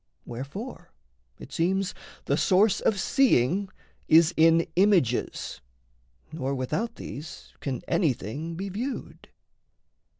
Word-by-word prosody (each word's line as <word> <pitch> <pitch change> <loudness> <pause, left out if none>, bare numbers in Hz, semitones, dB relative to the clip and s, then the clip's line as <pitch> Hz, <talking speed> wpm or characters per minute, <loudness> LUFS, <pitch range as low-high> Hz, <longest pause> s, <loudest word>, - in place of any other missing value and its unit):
Wherefore 140 - -7 0.5
it - - -12
seems 190 +3 0 0.3
The - - +2
source 200 +2 +3
of 200 - +1
seeing 195 - +2 0.4
is 165 +2 +6
in 165 +1 +5
images, 180 - +1 0.7
Nor 140 -3 -2
without 215 - -2
these 150 +2 -9
can 130 -4 -4
anything 150 - -1
be 195 +3 -4
viewed. 240 +8 -5
170 Hz, 100 wpm, -27 LUFS, 140-200 Hz, 0.7 s, is